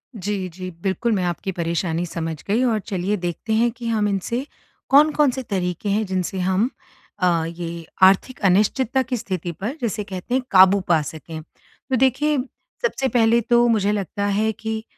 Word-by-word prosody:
जी, 200 -2 -3
जी 185 +2 -7
बिल्कुल। 195 +5 0
मैं 190 -3 0
आपकी 175 +3 -2
परेशानी 170 0 -1
समझ 165 -2 -4
गई 220 +5 +2
और 230 -4 +2
चलिए 195 0 -2
देखते 175 +5 -3
हैं, 235 +2 +3
कि 235 0 -7
हम 215 -2 +1
इनसे 205 +6 -2 0.4
कौन-कौन 295 0 +5
से 260 +1 -5
तरीके 185 -2 -2
हैं, 210 +2 +1
जिनसे 185 0 -2
हम 190 +6 +1 0.5
अ, 170 -3 +2
ये 170 0 -6 0.2
आर्थिक 195 +7 +4
अनिश्चितता 215 +7 +2
की 255 0 -3
स्थिति 185 -5 -4
पर 210 - -5
जिसे 220 -3 -2
कहते 195 +4 -6
हैं 260 - +1
काबू 190 0 +7
पा 165 -3 +4
सकें। 160 +1 -7
तो 255 - -8
देखिए 265 +4 +2 0.4
सबसे 450 - 0
पहले 230 0 +4
तो 240 +1 +3
मुझे 210 -3 +2
लगता 200 0 -2
है 210 +2 +1
कि 220 0 -4
200 Hz, 170 wpm, -22 LUFS, 180-235 Hz, 0.5 s, काबू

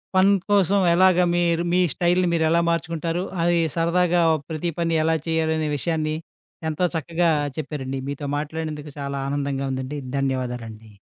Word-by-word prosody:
పని 190 +2 +5 0.2
కోసం 200 0 +4
ఎలాగా 180 0 +5
మీరు 170 -1 +2
మీ 180 - +4
స్టైల్‌ని 180 +1 +2
మీరెలా 165 +1 +3
మార్చుకుంటారు? 165 +1 -1 0.2
అది 175 0 +3 0.2
సరదాగా 175 +1 +2 0.3
ప్రతి 160 +2 -2
పని 165 -1 +1
ఎలా 160 +1 +2
చేయాలనే 160 -1 0
విషయాన్ని, 155 0 -1 0.5
ఎంతో 175 +4 +1
చక్కగా 170 +2 +1 0.3
చెప్పారండి. 135 -4 -4
మీతో 145 +1 -5
మాట్లాడినందుకు 155 0 -5
చాలా 140 0 -3
ఆనందంగా 140 -1 -2
ఉందండి. 130 +3 -4 0.2
ధన్యవాదాలండి. 125 -5 -3
160 Hz, 130 wpm, -23 LUFS, 145-175 Hz, 0.5 s, పని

